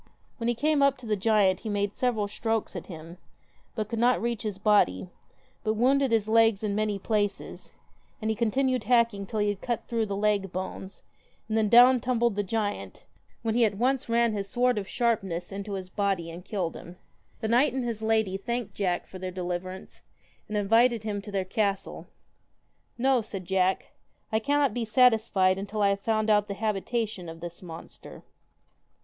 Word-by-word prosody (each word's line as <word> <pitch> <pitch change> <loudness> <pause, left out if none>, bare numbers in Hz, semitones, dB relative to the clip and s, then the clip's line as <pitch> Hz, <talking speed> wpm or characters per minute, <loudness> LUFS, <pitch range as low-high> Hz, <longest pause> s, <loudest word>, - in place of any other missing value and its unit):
When 230 - -3
he 240 - +1
came 300 +3 +1
up 275 -1 +4
to 255 - -12
the 215 -1 0
giant 205 -2 +3
he 220 - -6
made 205 0 -1
several 230 -5 0
strokes 225 +1 -2
at - - -6
him, 165 0 -10 0.6
but 215 -3 -2
could 230 0 -4
not 245 +2 +3
reach 235 -1 -2
his 210 -3 -4
body, 195 - +2 0.5
but 215 0 0
wounded 265 +3 +3
his 220 -2 +2
legs 225 -2 +4
in 210 -1 -1
many 210 0 0
places; 205 0 -2 0.5
and 220 -2 -1
he - - -1
con 230 0 +1
tinued 255 -2 0
hacking 230 -4 +2
till 215 - -3
he 205 - +2
had 205 -1 -3
cut 240 -2 -3
through 230 -2 -1
the 200 - -3
leg 200 -2 0
bones, 190 +1 -6 0.4
and 220 - -2
then 220 -1 +2
down 245 +2 +7
tumbled 235 -3 +1
the 205 - +1
giant, 205 +1 -3 0.4
when 225 -1 0
he 240 +1 +3
at 210 -2 +2
once 255 +2 0
ran 235 -1 +2
his 200 -1 -3
sword 245 -1 +2
of 195 - -6
sharpness 195 -8 -1
into 200 +1 -5
his 185 -1 -6
body 195 -5 -1
and 175 +2 -10
killed 185 -6 -3
him. 175 +1 -11 0.4
The 220 - -2
knight 245 +5 +4
and 260 -2 -2
his 230 -2 -3
lady 220 -3 +1
thanked 235 0 -4
Jack 180 -4 -1
for 185 - -11
their 185 0 -4
deliverance, 180 +1 -5 0.5
and 210 - -3
invited 225 +3 +3
him 205 -2 -3
to 205 +1 -9
their 195 -2 -1
castle. 200 0 -2 0.5
* - - -45
No,' 260 0 +3
said 195 -4 -7
Jack, 190 0 0 0.2
' - - -43
I 220 - +3
cannot 285 +3 +1
be 245 - -2
satisfied 215 -5 +3
until 205 +1 -2
I 200 - +5
have 200 0 0
found 215 +1 +1
out 210 0 +3
the 200 - -4
habitation 215 -2 -2
of 165 0 -9
this 170 0 -8
monster.' 165 -2 -11
215 Hz, 195 wpm, -27 LUFS, 195-235 Hz, 0.6 s, down